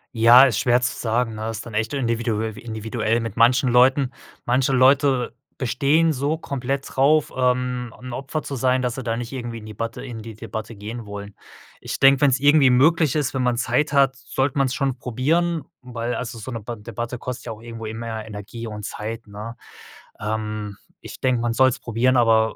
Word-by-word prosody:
Ja, 115 +3 +8
ist 130 -6 +3
schwer 125 0 +3
zu 120 - 0
sagen, 115 0 0
ne? 110 +1 -4
Ist 115 -1 -5
dann 115 - -9
echt 110 +3 -1
individue 115 -4 -1
individuell 115 0 -2
mit 115 -2 -5
manchen 125 +2 +4
Leuten. 130 +2 +4 0.3
Manche 130 +2 +2
Leute 130 0 +3 0.2
bestehen 140 +6 +2
so 145 +3 -1
komplett 135 -2 -3
drauf, 145 +3 +3
ähm, 125 -1 0
'n 125 0 -9
Opfer 135 +5 -4
zu 140 - -5
sein, 130 0 +2
dass 125 -1 -1
sie 130 - -5
da 115 -1 -1
nicht 115 0 -5
irgendwie 120 -3 -5
in 105 - -12
die 105 - -8
Batte 115 +2 -5
in 115 -3 -7
die 115 0 -8
Debatte 110 +1 -7
gehen 110 +3 -7
wollen. 100 0 -8 0.5
Ich - - -5
denke, 135 0 +6
wenn's 135 -2 +4
irgendwie 145 -2 +6
möglich 155 +3 +4
ist, 145 -4 0
wenn 130 - -1
man 125 -1 +2
Zeit 145 +5 0
hat, 135 -1 +3
sollte 130 +2 -2
man's 135 -1 +2
schon 135 -2 -1
probieren, 160 +7 0 0.2
weil 120 -1 -4
also, 115 -1 -5
so 115 +4 -7
'ne 115 - -4
Ba 120 +3 -6
Debatte 120 +3 -6
kostet 125 +1 -6
ja 115 - -5
auch 110 - -14
irgendwo 115 -1 -8
immer 110 0 -5
Energie 110 +2 -7
und 105 -1 -7
Zeit, 110 +3 -6
ne? 105 +3 -8 0.6
Ähm, 105 -1 -3 0.3
ich - - -10
denke, 130 -2 +2
man 120 -1 0
soll's 130 +1 +3
probieren, 125 +3 +1
aber 115 -2 +3
120 Hz, 195 wpm, -22 LUFS, 115-130 Hz, 0.6 s, Ja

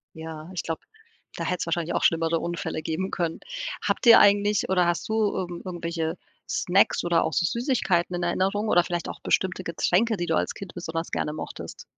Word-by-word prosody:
Ja, 160 0 -8
ich 175 - -3
glaube, 165 -1 -4 0.5
da - - -4
hätte 180 - -1
es - - -1
wahrscheinlich 170 0 -1
auch - - 0
schlimmere 165 0 +2
Unfälle 170 -2 -3
geben 175 +5 -3
können. 170 -3 -2 0.5
Habt - - 0
ihr 230 - +10
eigentlich 205 0 +4
oder 180 -2 +3
hast 175 - -1
du - - 0 0.2
irgend 175 -1 -4
irgendwelche 170 -2 -3 0.3
Snacks 185 +3 +2
oder 175 -1 +2
auch 160 - -2
so 170 - +2
Süßigkeiten 190 - 0
in 175 - -2
Erinnerung 195 +5 0
oder 175 0 +5
vielleicht 175 -1 -3
auch - - -7
bestimmte 185 0 0
Getränke, 190 +6 +1
die 175 - -2
du 165 - +1
als - - 0
Kind 195 -3 -9
besonders 165 -1 -4
gerne 150 - -1
mochtest? 155 - -7
175 Hz, 195 wpm, -26 LUFS, 165-190 Hz, 0.5 s, ihr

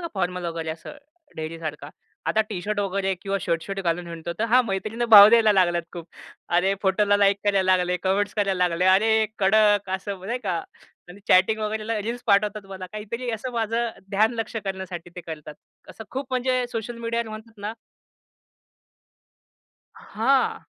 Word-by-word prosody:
का 340 - -4
फॉर्मल 180 -1 -2
वगैरे 165 -1 -4
असं 165 - -9 0.4
ढेरीसारखा. 155 -2 -6 0.4
आता 220 - +2
टी-शर्ट 205 +1 -3
वगैरे 195 -1 -1
किंवा 200 0 -1
शर्ट-शर्ट 180 +3 -2
घालून 175 -1 -1
हिंडतो. 170 0 -6
तर 220 - +1
हा 250 - +7
मैत्रिणींना 220 +3 -3
भाव 205 0 +12
द्यायला 225 -2 +5
लागल्यात 175 -3 +2
खूप. 170 -1 -8 0.5
अरे 190 +2 +2
फोटोला 205 +1 +3
लाइक 200 0 +3
करायला 190 -2 +3
लागले, 180 0 0
कमेंट्स 200 +1 +1
करायला 195 -4 +1
लागले, 170 +1 -1
"अरे! 220 +3 +1 0.3
कडक 205 0 +3
असं 195 -1 -7
नाही 240 +4 -2
का" 175 - 0 0.5
आणि 195 +3 -13
चॅटिंग 190 +4 +4
वगैरेला 215 +1 -2
रील्स 235 +3 -4
पाठवतात 205 0 +2
मला. 190 -1 -8
काहीतरी 230 +4 -5
असं 230 +3 -5
माझं 230 0 -1 0.2
ध्यान 215 +3 +3
लक्ष्य 225 0 -4
करण्यासाठी 190 -3 -6
ते 180 - -5
करतात. 155 -2 -8 0.4
असं 220 - -10
खूप 270 +1 -4
म्हणजे 255 0 0
सोशल 230 +1 -5
मीडियावर 230 0 -2
म्हणतात 220 0 -10
ना 210 - -3 2.2
हां. 260 +5 0
200 Hz, 155 wpm, -24 LUFS, 180-220 Hz, 2.2 s, भाव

